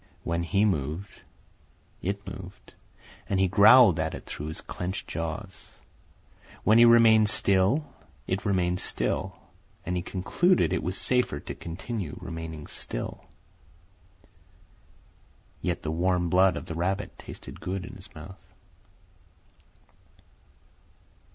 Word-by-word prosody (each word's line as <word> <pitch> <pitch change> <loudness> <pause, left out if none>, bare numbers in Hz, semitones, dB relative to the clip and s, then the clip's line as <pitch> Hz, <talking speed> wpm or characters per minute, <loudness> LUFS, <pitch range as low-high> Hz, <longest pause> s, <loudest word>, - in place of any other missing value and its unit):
When 85 +1 -1
he 100 +5 +2
moved 80 0 -2 0.8
it 100 +2 -3
moved, 95 -1 -10 0.6
and 95 - +1
he 95 - +4
growled 100 -1 +7
at 80 0 -1
it - - -10
through 75 - -6
his 80 - -6
clenched 90 +2 -5
jaws; 85 +4 -6 0.9
when 110 +2 +5
he 120 - +9
remained 115 -2 +6
still, 100 +12 +2 0.4
it 95 +2 -2
remained 90 -3 +1
still, - - -2 0.5
and 90 - -2
he 90 - -1
concluded 95 - +1
it - - 0
was 90 +1 -3
safer 125 - 0
to - - -6
continue 90 0 -6
remaining 80 -2 -7
still. - - -6 2.4
Yet 90 -2 -2
the 80 - -2
warm 90 +1 +1
blood 95 0 +4
of - - -6
the 85 - -6
rabbit 95 +5 -2
tasted - - -10
good 95 0 -3
in - - -10
his 95 0 -10
mouth. 80 +5 -11
95 Hz, 120 wpm, -27 LUFS, 85-100 Hz, 2.4 s, he